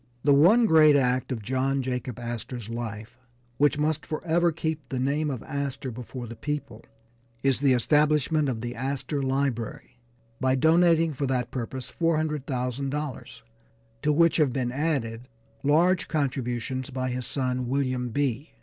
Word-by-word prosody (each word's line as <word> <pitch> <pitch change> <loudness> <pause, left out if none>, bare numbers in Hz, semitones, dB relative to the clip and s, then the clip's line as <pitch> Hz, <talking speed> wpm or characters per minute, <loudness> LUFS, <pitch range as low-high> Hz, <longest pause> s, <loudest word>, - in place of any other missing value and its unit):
The 145 - +5
one 190 +12 +6
great 155 -6 +6
act 130 -2 +1
of 115 -4 -3
John 130 +3 0
Jacob 125 -2 -3
Astor's 120 -1 -6
life, 115 0 -6 0.4
which 145 +1 +4
must 150 0 0
forever 170 +2 +1
keep 160 -1 -4
the 130 - -3
name 145 +4 0
of 130 -5 -4
Astor 140 -3 -4
before 125 +1 -7
the 115 0 -8
people, 140 -5 -5 0.6
is 135 -2 +2
the 140 -2 +4
establishment 150 +3 +2
of 115 -4 -3
the 120 0 -4
Astor 135 +3 -3
Library 130 -3 -2 0.4
by 130 0 +2
donating 165 +2 +4
for 140 +1 -2
that 125 -2 -1
purpose 130 0 -5
$400,000, 145 -3 -2 0.6
to 150 - +2
which 165 +2 +4
have 150 -5 +3
been 125 -1 -1
added 125 -5 -2 0.3
large 165 +5 +3
contributions 130 -3 -2
by 130 -1 -2
his 125 -1 -4
son 130 -2 -2
William 130 -2 0
B. 140 +3 -2
135 Hz, 145 wpm, -26 LUFS, 125-150 Hz, 0.6 s, one